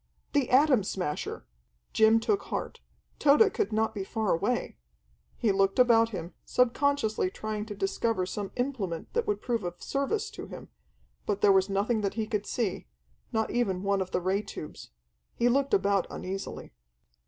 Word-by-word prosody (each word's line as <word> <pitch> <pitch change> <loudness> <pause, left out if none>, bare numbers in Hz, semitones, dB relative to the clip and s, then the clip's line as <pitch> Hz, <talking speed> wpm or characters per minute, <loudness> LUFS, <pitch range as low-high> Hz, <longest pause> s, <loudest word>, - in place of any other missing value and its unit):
The 285 -4 +2
Atom 260 -4 +5
Smasher! 180 -6 -3 0.5
Jim 220 +1 +5
took 395 - +1
heart. - - -4 0.4
Tode 305 +9 +5
could 430 - -1
not 220 +1 +1
be 200 - -3
far 220 +1 0
away! 205 +9 -1 0.6
He 225 -4 +2
looked 195 0 +2
about 230 -2 +5
him, 175 -5 -6
subconsciously 250 -5 +1
trying 215 +2 -4
to 210 - -6
discover 195 0 0
some 195 +1 -4
implement 235 -10 -3
that 470 -1 0
would 415 - 0
prove 235 -4 -1
of 175 0 -6
service 400 +11 -1
to - - -8
him, - - -10 0.6
but 205 -1 -1
there 205 - +6
was 190 0 +3
nothing 210 +3 +1
that 200 -1 -2
he 220 -1 -1
could 210 -1 -3
see, 215 - -2 0.4
not 220 -1 0
even 195 -6 0
one 200 -1 +1
of 185 - -3
the 180 - -1
ray 190 +3 +1
tubes. 200 -7 -9 0.5
He 240 - +2
looked 275 +2 +1
about 200 -1 +2
uneasily. 195 - -6
215 Hz, 165 wpm, -28 LUFS, 195-245 Hz, 0.6 s, there